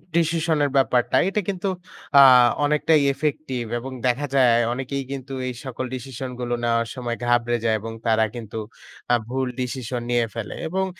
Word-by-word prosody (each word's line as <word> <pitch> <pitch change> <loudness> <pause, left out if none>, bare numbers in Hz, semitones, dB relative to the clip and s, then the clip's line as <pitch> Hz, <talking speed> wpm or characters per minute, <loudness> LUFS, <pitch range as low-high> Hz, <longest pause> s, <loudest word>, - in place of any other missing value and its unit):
Decision 165 -1 +1
এর - - 0
ব্যাপারটা 125 -2 +2
এটা 210 +2 0
কিন্তু 190 0 -2 0.5
আ - - +11 0.4
অনেকটাই 150 +1 +3
ইফেক্টিভ 140 -3 -2 0.2
এবং 130 +3 -7 0.2
দেখা 125 +4 0
যায় 120 -3 +5
অনেকেই 135 +2 -3
কিন্তু 135 0 -6
এই 125 - -3
সকল 130 0 -4
ডিসিশনগুলো 125 -1 -5
নেওয়ার 115 0 +1
সময় 120 -2 -4
ঘাবড়ে 120 0 +2
যায় 110 -1 +3
এবং 115 +1 -6
তারা 110 0 +3
কিন্তু 115 -2 -7 0.6
আ - - +7
ভুল 130 +1 -1
ডিসিশন 125 -1 -3
নিয়ে 120 -1 +2
ফেলে। 115 -2 -5
এবং 190 +3 -1
125 Hz, 160 wpm, -23 LUFS, 120-140 Hz, 0.6 s, আ